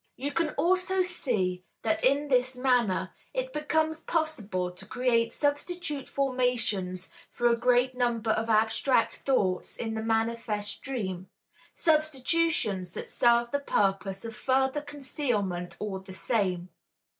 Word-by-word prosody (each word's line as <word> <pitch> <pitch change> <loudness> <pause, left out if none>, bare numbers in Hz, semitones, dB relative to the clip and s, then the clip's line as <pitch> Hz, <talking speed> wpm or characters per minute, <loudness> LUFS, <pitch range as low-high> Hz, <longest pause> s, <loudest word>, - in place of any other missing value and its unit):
You 280 +3 -3
can 330 +1 +1
also 370 +4 +2
see 210 - -1 0.2
that 220 -1 0
in 280 +3 +4
this 255 -1 +2
manner 245 -7 +1 0.2
it - - -2
becomes 315 +1 0
possible 220 - -1
to 180 +2 -10
create 235 -1 +1
substitute 290 0 -2
formations 240 -9 -1 0.2
for 240 - +1
a 235 - +4
great 250 +2 +3
number 240 -3 0
of 225 +1 0
abstract 225 +3 +2
thoughts 195 -9 0
in 225 -1 -3
the 220 - -2
manifest 225 -2 -1
dream, 190 -8 -4 0.5
substitutions 305 - +1
that - - -5
serve 235 0 +3
the 285 - +1
purpose 195 -6 0
of 225 -1 -6
further 265 +3 +1
concealment 245 - -3
all 200 -2 -3
the 190 0 -11
same. 185 -6 -1
240 Hz, 130 wpm, -28 LUFS, 205-285 Hz, 0.5 s, in